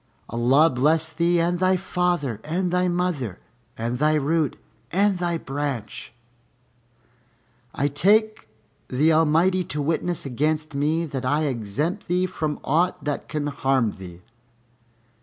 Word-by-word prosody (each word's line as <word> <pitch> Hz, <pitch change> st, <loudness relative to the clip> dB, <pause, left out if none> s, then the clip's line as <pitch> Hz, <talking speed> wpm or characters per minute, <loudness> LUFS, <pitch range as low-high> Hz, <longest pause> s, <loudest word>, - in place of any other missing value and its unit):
Allah 130 Hz, +7 st, +4 dB
bless 155 Hz, +5 st, +2 dB
thee 170 Hz, +1 st, +1 dB
and 175 Hz, +1 st, +1 dB
thy 185 Hz, 0 st, +3 dB
father 175 Hz, -, -1 dB
and 175 Hz, +4 st, -1 dB
thy 180 Hz, 0 st, +2 dB
mother 175 Hz, -, -1 dB, 0.4 s
and 120 Hz, +2 st, -3 dB
thy 155 Hz, +1 st, +3 dB
root 155 Hz, 0 st, 0 dB, 0.3 s
and 195 Hz, +1 st, +2 dB
thy 175 Hz, -1 st, 0 dB
branch! 140 Hz, -5 st, -5 dB, 1.6 s
I 140 Hz, -, +1 dB
take 210 Hz, +9 st, +2 dB, 0.4 s
the 150 Hz, +5 st, +2 dB
Almighty 165 Hz, +4 st, +3 dB
to 150 Hz, 0 st, -4 dB
witness 165 Hz, +3 st, -1 dB
against 155 Hz, +4 st, -1 dB
me 155 Hz, +4 st, 0 dB
that 135 Hz, -4 st, -5 dB
I 145 Hz, +4 st, +1 dB
exempt 145 Hz, -, -2 dB
thee 180 Hz, +1 st, +1 dB
from 155 Hz, -4 st, -3 dB
aught 170 Hz, +6 st, +1 dB
that 145 Hz, -1 st, -3 dB
can 150 Hz, -1 st, -2 dB
harm 135 Hz, -5 st, +1 dB
thee." 90 Hz, -3 st, -11 dB
155 Hz, 130 wpm, -24 LUFS, 135-175 Hz, 1.6 s, Allah